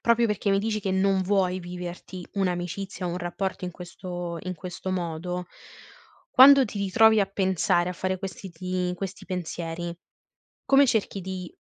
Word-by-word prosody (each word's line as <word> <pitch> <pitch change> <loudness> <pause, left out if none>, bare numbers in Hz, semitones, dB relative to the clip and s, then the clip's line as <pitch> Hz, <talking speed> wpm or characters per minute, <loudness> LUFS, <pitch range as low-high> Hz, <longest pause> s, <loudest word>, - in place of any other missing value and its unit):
proprio 235 0 +3
perché 210 -1 0
mi 195 - +3
dici 215 0 -1
che 195 -1 -2
non 190 0 +2
vuoi 185 -1 +1
viverti 180 +1 -7
un'amicizia, 185 0 -2
un 175 +1 -2
rapporto 180 +2 -3
in 180 - -3
questo 175 -1 -6
in 185 0 -4
questo 185 +2 -6
modo, 175 0 -3 0.8
quando 275 +1 +9
ti 205 -3 -6
ritrovi 220 +3 +5
a 195 - +2
pensare 190 -2 +1
a - - -3
fare 185 +1 -2
questi 190 0 -7
ti 180 +1 -2
questi 190 +1 -6
pensieri, 170 -1 -4 0.7
come 275 +1 +6
cerchi 215 -5 0
di 185 -1 -5
185 Hz, 155 wpm, -26 LUFS, 175-195 Hz, 0.8 s, quando